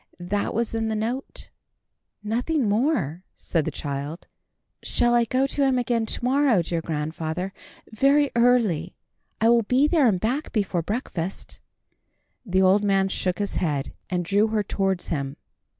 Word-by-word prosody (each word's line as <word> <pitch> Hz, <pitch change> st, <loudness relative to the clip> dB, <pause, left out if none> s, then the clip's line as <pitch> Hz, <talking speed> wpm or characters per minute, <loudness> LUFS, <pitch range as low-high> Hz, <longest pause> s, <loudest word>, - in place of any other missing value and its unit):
That 200 Hz, +4 st, -2 dB
was 230 Hz, 0 st, -1 dB
in 225 Hz, 0 st, -1 dB
the 220 Hz, -, -1 dB
note." 235 Hz, +5 st, -4 dB, 0.7 s
"Nothing 245 Hz, +5 st, 0 dB
more," 205 Hz, -, 0 dB
said 165 Hz, -4 st, -1 dB
the -, -, 0 dB
child. 145 Hz, +3 st, -5 dB, 0.6 s
"Shall 240 Hz, 0 st, +1 dB
I 240 Hz, -1 st, +4 dB
go 255 Hz, +4 st, +1 dB
to 280 Hz, +1 st, -2 dB
him 265 Hz, -2 st, +3 dB
again 235 Hz, -2 st, 0 dB
to -, -, -2 dB
morrow, 260 Hz, -7 st, +3 dB
dear 165 Hz, 0 st, -2 dB
grandfather? 160 Hz, +4 st, -3 dB, 0.4 s
Very 275 Hz, +5 st, +3 dB
early. 230 Hz, -9 st, +2 dB, 0.4 s
I 225 Hz, -, +4 dB
will 235 Hz, 0 st, +5 dB
be 255 Hz, +6 st, +2 dB
there 305 Hz, -5 st, +4 dB
and 190 Hz, -5 st, +2 dB
back 255 Hz, -, -2 dB
before 195 Hz, -5 st, 0 dB
breakfast." 190 Hz, -2 st, -4 dB, 0.8 s
The 190 Hz, -4 st, +1 dB
old 195 Hz, +2 st, +4 dB
man 195 Hz, -1 st, +2 dB
shook 185 Hz, -1 st, -1 dB
his 205 Hz, -1 st, -3 dB
head, 145 Hz, -6 st, -1 dB, 0.2 s
and 180 Hz, -2 st, -1 dB
drew 205 Hz, +4 st, +3 dB
her 215 Hz, -1 st, 0 dB
towards 195 Hz, -2 st, -1 dB
him. 140 Hz, -3 st, -3 dB
210 Hz, 155 wpm, -24 LUFS, 175-240 Hz, 0.8 s, will